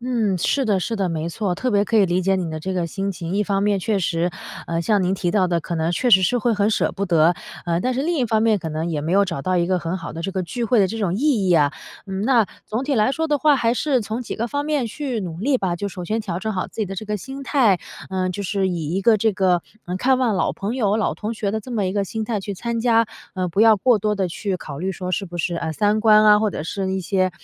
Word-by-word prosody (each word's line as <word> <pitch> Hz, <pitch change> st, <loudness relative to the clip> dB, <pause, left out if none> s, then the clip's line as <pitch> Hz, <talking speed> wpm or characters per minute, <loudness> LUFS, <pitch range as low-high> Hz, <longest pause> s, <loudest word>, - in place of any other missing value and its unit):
嗯， 230 Hz, -6 st, 0 dB
是 270 Hz, +10 st, +1 dB
的 205 Hz, -5 st, +1 dB
是 225 Hz, +5 st, -2 dB
的， 195 Hz, -3 st, 0 dB
没 165 Hz, -1 st, -2 dB
错， 185 Hz, +2 st, -2 dB
特 255 Hz, +8 st, -2 dB
别 205 Hz, -2 st, +3 dB
可 225 Hz, +3 st, 0 dB
以 210 Hz, -, +6 dB
理 180 Hz, 0 st, +1 dB
解 195 Hz, +1 st, +2 dB
你 180 Hz, -3 st, -2 dB
的 155 Hz, -, -4 dB
这 190 Hz, +4 st, -4 dB
个 180 Hz, -, 0 dB
心 195 Hz, +3 st, -3 dB
情。 170 Hz, -1 st, -6 dB
一 205 Hz, -, +2 dB
方 200 Hz, -1 st, 0 dB
面 205 Hz, -1 st, +2 dB
确 210 Hz, +3 st, 0 dB
实， 170 Hz, -1 st, 0 dB, 0.4 s
呃， 170 Hz, 0 st, -1 dB
像 205 Hz, +3 st, +2 dB
您 185 Hz, +1 st, +1 dB
提 180 Hz, -2 st, -1 dB
到 190 Hz, -1 st, +2 dB
的， 170 Hz, -2 st, 0 dB
可 170 Hz, -, -4 dB
能 160 Hz, +1 st, 0 dB
确 245 Hz, +7 st, +1 dB
实 190 Hz, -, +8 dB
是 245 Hz, +7 st, +2 dB
会 240 Hz, 0 st, +1 dB
很 205 Hz, -1 st, +2 dB
舍 220 Hz, -, +1 dB
不 200 Hz, 0 st, -3 dB
得， 170 Hz, -1 st, +4 dB, 0.3 s
呃， 170 Hz, 0 st, 0 dB
但 255 Hz, +5 st, 0 dB
是 260 Hz, -, -1 dB
另 340 Hz, +3 st, 0 dB
一 255 Hz, -, +1 dB
方 220 Hz, -1 st, +1 dB
面 220 Hz, -2 st, +3 dB
可 165 Hz, -, -5 dB
能 160 Hz, +2 st, -3 dB
也 155 Hz, -3 st, -2 dB
没 160 Hz, +4 st, -2 dB
有 200 Hz, +1 st, +5 dB
找 170 Hz, -6 st, -4 dB
到 185 Hz, +5 st, 0 dB
一 170 Hz, -1 st, +2 dB
个 185 Hz, -1 st, +2 dB
很 170 Hz, +1 st, -3 dB
好 170 Hz, -4 st, -7 dB
的 165 Hz, -, -6 dB
这 190 Hz, +3 st, -3 dB
个 190 Hz, -1 st, -1 dB
聚 235 Hz, +8 st, -3 dB
会 230 Hz, 0 st, +3 dB
的 190 Hz, -, +3 dB
这 225 Hz, +3 st, -5 dB
种 185 Hz, -4 st, 0 dB
意 225 Hz, -5 st, +1 dB
义 -, -, +4 dB
啊。 145 Hz, -1 st, +3 dB, 0.3 s
嗯， 195 Hz, 0 st, -3 dB
那 235 Hz, -2 st, +4 dB, 0.2 s
总 220 Hz, +4 st, -2 dB
体 280 Hz, +1 st, -1 dB
来 215 Hz, +5 st, +3 dB
说 320 Hz, +1 st, -1 dB
的 295 Hz, -1 st, +2 dB
话， 300 Hz, 0 st, +4 dB
还 230 Hz, -2 st, +2 dB
是 265 Hz, 0 st, +1 dB
从 220 Hz, +2 st, -4 dB
几 245 Hz, -, -5 dB
个 235 Hz, +2 st, -2 dB
方 285 Hz, +3 st, -2 dB
面 300 Hz, -4 st, 0 dB
去 245 Hz, 0 st, -3 dB
努 170 Hz, -4 st, -6 dB
力 265 Hz, +7 st, +2 dB
吧。 185 Hz, -7 st, -1 dB
就 200 Hz, +3 st, -3 dB
首 180 Hz, -2 st, -7 dB
先 220 Hz, +5 st, -1 dB
调 185 Hz, -5 st, -4 dB
整 220 Hz, +2 st, -2 dB
好 185 Hz, -2 st, -2 dB
自 -, -, -8 dB
己 210 Hz, -, 0 dB
的 195 Hz, -, -6 dB
这 215 Hz, -, -5 dB
个 210 Hz, 0 st, -1 dB
心 265 Hz, +8 st, -8 dB
态， 235 Hz, -8 st, +3 dB, 0.3 s
呃， 185 Hz, -1 st, -1 dB
就 185 Hz, +3 st, -4 dB
是 195 Hz, 0 st, 0 dB
以 165 Hz, -4 st, -3 dB
一 190 Hz, -, 0 dB
个 220 Hz, +3 st, +5 dB
这 220 Hz, +1 st, +1 dB
个， 185 Hz, -2 st, +2 dB, 0.2 s
呃， 180 Hz, -, -3 dB
看 255 Hz, +6 st, +2 dB
望 245 Hz, -5 st, +1 dB
老 185 Hz, -, 0 dB
朋 205 Hz, +5 st, -4 dB
友、 210 Hz, -5 st, +1 dB
老 220 Hz, -, 0 dB
同 215 Hz, +1 st, -4 dB
学 210 Hz, -3 st, -2 dB
的 220 Hz, -, -1 dB
这 250 Hz, -, -11 dB
么 210 Hz, -5 st, 0 dB
一 185 Hz, -, -2 dB
个 200 Hz, 0 st, 0 dB
心 220 Hz, +3 st, -4 dB
态 215 Hz, -2 st, -2 dB
去 200 Hz, +1 st, -5 dB
参 230 Hz, +4 st, -3 dB
加， 230 Hz, -1 st, +3 dB, 0.3 s
呃， 185 Hz, -2 st, -1 dB
不 195 Hz, +5 st, 0 dB
要 225 Hz, -1 st, +7 dB
过 240 Hz, +4 st, +3 dB
多 210 Hz, +1 st, 0 dB
地 195 Hz, -2 st, 0 dB
去 190 Hz, +2 st, -3 dB
考 145 Hz, -5 st, -8 dB
虑 185 Hz, +4 st, -2 dB
说 185 Hz, -1 st, -5 dB
是 195 Hz, -, -1 dB
不 175 Hz, -1 st, -8 dB
是， 175 Hz, +1 st, -1 dB
啊， 165 Hz, -1 st, -2 dB
三 210 Hz, +5 st, +1 dB
观 215 Hz, -1 st, +6 dB
啊， 210 Hz, 0 st, +7 dB
或 215 Hz, -1 st, +1 dB
者 150 Hz, -, -5 dB
是 190 Hz, +3 st, -3 dB
一 190 Hz, -, -1 dB
些， 185 Hz, +1 st, +1 dB
200 Hz, 330 characters per minute, -22 LUFS, 180-225 Hz, 0.4 s, 实